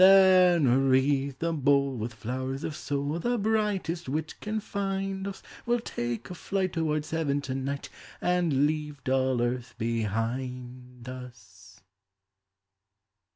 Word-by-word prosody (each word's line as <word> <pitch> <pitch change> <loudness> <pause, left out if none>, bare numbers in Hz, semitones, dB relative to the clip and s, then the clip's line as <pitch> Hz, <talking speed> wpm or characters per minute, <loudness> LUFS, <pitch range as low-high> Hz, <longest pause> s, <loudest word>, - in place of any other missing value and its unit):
Then 185 -4 +7 0.2
wreathe 135 +1 +3
the 165 +2 -1
bowl 140 -2 +3
With 115 0 -4
flowers 130 +5 -4
of 155 - -3
soul. 145 +3 -2
The 240 +7 0
brightest 205 - 0
wit 155 +3 -2
can 215 +1 -2
find 195 -1 -2
us; 195 - -7 0.2
We'll 240 0 +3
take 120 - -4
a - - -3
flight 185 +1 -1
Towards 155 -2 -1
heaven 155 -3 +1
to 130 -2 -4
night. 135 +1 -3 0.3
And 175 -6 +2
leave 150 -2 -2
dull 130 -2 +2
earth 120 0 -2
behind 125 +3 -3
us! 105 -7 -11
140 Hz, 125 wpm, -28 LUFS, 125-180 Hz, 0.3 s, Then